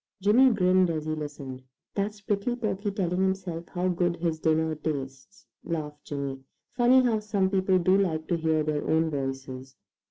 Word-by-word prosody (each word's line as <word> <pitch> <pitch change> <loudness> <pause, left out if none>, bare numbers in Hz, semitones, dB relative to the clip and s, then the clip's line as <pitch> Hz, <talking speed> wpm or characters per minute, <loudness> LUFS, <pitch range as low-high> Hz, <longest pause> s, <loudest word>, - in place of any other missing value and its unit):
Jimmy 230 +7 +5
grinned 185 -3 +3
as 155 -2 -2
he 155 - -2
listened. 145 -4 -6 0.3
"That's 205 +1 -2
Prickly 205 +4 -1
Porky 215 -3 -2
telling 185 -3 -1
himself 185 -3 -2
how 180 0 -1
good 175 -1 +1
his 165 -2 -2
dinner 160 0 +1
tastes," 145 +3 -6 0.2
laughed 150 -3 -5
Jimmy. 140 -2 -4 0.3
"Funny 255 +1 +5
how 230 -3 +2
some 200 -3 0
people 190 -1 +3
do 185 +2 +3
like 160 -5 -1
to 175 - +2
hear 160 -1 +1
their 150 -1 -1
own 160 0 +2
voices." 135 -1 -5
170 Hz, 165 wpm, -27 LUFS, 155-195 Hz, 0.3 s, Jimmy